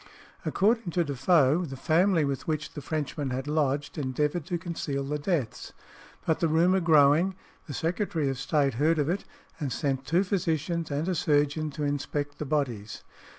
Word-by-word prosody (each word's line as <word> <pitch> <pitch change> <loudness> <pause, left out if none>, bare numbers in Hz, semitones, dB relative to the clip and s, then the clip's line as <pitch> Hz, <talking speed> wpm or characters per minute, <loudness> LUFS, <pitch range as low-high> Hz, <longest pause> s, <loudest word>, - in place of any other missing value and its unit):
According 220 0 +2
to 175 - +2
Defoe, 145 +2 +3
the 135 -5 -6
family 165 +4 +3
with 140 -1 -3
which 155 -1 -2
the 145 - -6
Frenchmen 145 -1 -3
had 130 +2 -3
lodged 145 0 0
endeavoured 150 +4 -1
to 175 - -1
conceal 165 -5 -3
the 150 +2 -3
deaths; 145 - -2 0.5
but 160 - +1
the 165 - +2
rumour 170 +4 +3
growing, 160 +2 +4 0.3
the 145 - -6
Secretary 170 -2 -1
of 135 -2 -2
State 140 -1 +1
heard 155 +7 +2
of 145 0 +1
it, 190 +3 -1 0.3
and 145 -5 -2
sent 135 -2 -2
two 170 +5 +3
physicians 170 -3 -1
and 145 +3 -2
a 185 - +1
surgeon 150 -1 +1
to 150 +1 -5
inspect 145 0 -2
the 150 - -3
bodies. 125 -8 -2
150 Hz, 170 wpm, -28 LUFS, 140-170 Hz, 0.5 s, growing